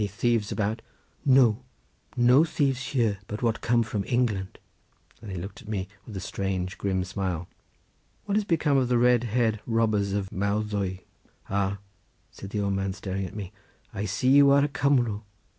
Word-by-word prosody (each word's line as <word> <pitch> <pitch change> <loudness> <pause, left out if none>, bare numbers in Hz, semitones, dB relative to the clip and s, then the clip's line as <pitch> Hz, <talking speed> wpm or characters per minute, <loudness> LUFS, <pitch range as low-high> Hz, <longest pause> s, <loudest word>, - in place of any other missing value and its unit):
"Any 105 - +1
thieves 105 +1 0
about?" 110 +1 -1 0.4
"No, 130 -5 +5 0.6
no 125 +5 +6
thieves 140 -5 0
here, 115 -7 +1
but 105 +3 -5
what 115 -2 0
come 120 0 +2
from 105 -2 -3
England," 115 -7 0 0.6
and 110 - -9
he 95 - -5
looked 95 +3 -7
at - - -16
me 100 -3 -3 0.2
with 105 -4 -7
a - - -3
strange, 95 0 -3
grim 95 -2 0
smile. 90 -3 -3 0.8
"What 200 - -1
is 210 - +2
become 160 -6 +2
of 130 -2 +2
the 125 0 +2
red 120 0 +4
haired 110 -1 +1
robbers 110 -4 +1
of 100 -1 -2
Mawddwy?" 100 -1 -1 0.5
"Ah," 100 0 0 0.5
said 100 - -9
the 105 0 -2
old 100 -1 0
man, 95 0 -1
staring 95 0 -4
at - - -11
me, 100 -3 -6 0.4
"I 100 - -3
see 110 +6 0
you 140 +1 +7
are 140 0 +5
a - - -2
Cumro. 125 -7 +1
105 Hz, 175 wpm, -27 LUFS, 100-125 Hz, 0.8 s, you